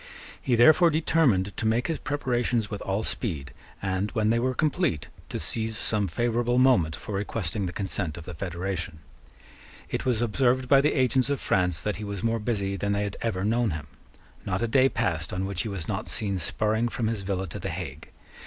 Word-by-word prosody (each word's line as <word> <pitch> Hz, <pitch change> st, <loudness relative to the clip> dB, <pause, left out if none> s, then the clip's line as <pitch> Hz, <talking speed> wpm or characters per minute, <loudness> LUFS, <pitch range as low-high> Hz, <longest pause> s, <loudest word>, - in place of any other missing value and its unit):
He 125 Hz, -, +2 dB
therefore 155 Hz, +9 st, +7 dB
determined 150 Hz, -, +2 dB
to 110 Hz, -, 0 dB
make 115 Hz, +3 st, +2 dB
his 165 Hz, -, -1 dB
preparations 125 Hz, -5 st, 0 dB
with 105 Hz, -, -4 dB
all 100 Hz, +3 st, -1 dB
speed, 75 Hz, -, -3 dB, 0.3 s
and, 95 Hz, +1 st, 0 dB
when 110 Hz, -2 st, +2 dB
they 115 Hz, -, +2 dB
were 130 Hz, +1 st, 0 dB
complete, 155 Hz, -, 0 dB, 0.2 s
to -, -, -3 dB
seize 110 Hz, -1 st, +1 dB
some 105 Hz, -3 st, +1 dB
favourable 120 Hz, +5 st, 0 dB
moment 125 Hz, -12 st, +4 dB
for 105 Hz, -, -7 dB
requesting 100 Hz, -1 st, -2 dB
the -, -, -4 dB
consent 90 Hz, -4 st, -3 dB
of 85 Hz, -, -8 dB
the 90 Hz, -, -7 dB
federation. 85 Hz, -2 st, -4 dB, 0.9 s
It -, -, -1 dB
was 125 Hz, -4 st, +1 dB
observed 125 Hz, +2 st, +2 dB
by 135 Hz, +1 st, +6 dB
the 150 Hz, -, +2 dB
agents 130 Hz, 0 st, +2 dB
of 140 Hz, -, 0 dB
France 90 Hz, -3 st, +1 dB
that 105 Hz, -, -1 dB
he 105 Hz, -, -6 dB
was 100 Hz, -2 st, -5 dB
more 115 Hz, 0 st, +1 dB
busy 100 Hz, -3 st, -1 dB
than 100 Hz, +2 st, 0 dB
they 100 Hz, 0 st, 0 dB
had 100 Hz, -1 st, -4 dB
ever 100 Hz, -5 st, -1 dB
known 115 Hz, +1 st, +2 dB
him. 80 Hz, -3 st, -4 dB, 0.6 s
Not 95 Hz, +3 st, -1 dB
a -, -, +1 dB
day 130 Hz, +3 st, +4 dB
passed 80 Hz, -8 st, -1 dB
on 95 Hz, +1 st, -2 dB
which 95 Hz, -2 st, -2 dB
he 110 Hz, -, -3 dB
was 95 Hz, -5 st, -5 dB
not -, -, -3 dB
seen 100 Hz, -3 st, -1 dB
spurring 110 Hz, +6 st, +1 dB
from 115 Hz, -, -2 dB
his 110 Hz, -2 st, -1 dB
villa 95 Hz, -1 st, -2 dB
to -, -, -6 dB
the -, -, -4 dB
Hague. -, -, -6 dB
110 Hz, 205 wpm, -27 LUFS, 95-120 Hz, 0.9 s, therefore